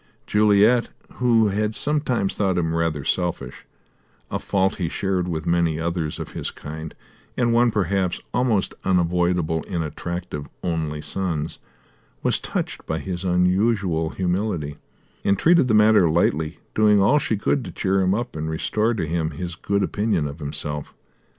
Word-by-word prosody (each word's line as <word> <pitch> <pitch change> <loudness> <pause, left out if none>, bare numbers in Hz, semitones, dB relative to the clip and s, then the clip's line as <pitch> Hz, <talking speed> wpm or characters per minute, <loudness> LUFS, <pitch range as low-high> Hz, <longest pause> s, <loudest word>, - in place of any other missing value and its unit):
Juliet, 105 +3 +4 0.3
who 115 -3 +3
had 105 +2 -1
sometimes 140 -9 +1
thought 95 -3 0
him 80 -2 0
rather 80 -4 -1
selfish 90 -2 -2 0.6
a - - -1
fault 95 -1 0
he 85 -4 -1
shared 95 0 -1
with 80 -3 -3
many 85 -2 +1
others 85 -2 -2
of - - -6
his - - -3
kind, 80 +1 -8 0.4
and 120 -2 +2
one 120 +1 +4
perhaps 95 -4 0
almost 120 -5 +1
unavoidable 85 -2 +1
in 85 -3 -2
attractive 80 -1 -5 0.2
only 80 -4 -2
sons 80 -1 -2 0.6
was - - +2
touched - - -4
by 80 - -1
his 90 +1 -4
unusual 90 -2 +2
humility, 90 -5 -2 0.5
and 100 0 +2
treated 170 -5 +4
the 110 - +3
matter 105 -4 +5
lightly, 80 -1 +1 0.2
doing 105 -1 +4
all 135 +10 +4
she 110 - -1
could 130 +6 0
to - - -7
cheer 95 -1 +1
him 95 +1 +2
up 120 -2 -4
and 80 0 -3
restore 110 +8 0
to 95 - -1
him 80 0 -1
his 85 +3 -5
good 100 +3 -1
opinion 100 -9 0
of 70 +3 -8
himself. 75 0 -5
90 Hz, 155 wpm, -23 LUFS, 80-105 Hz, 0.6 s, matter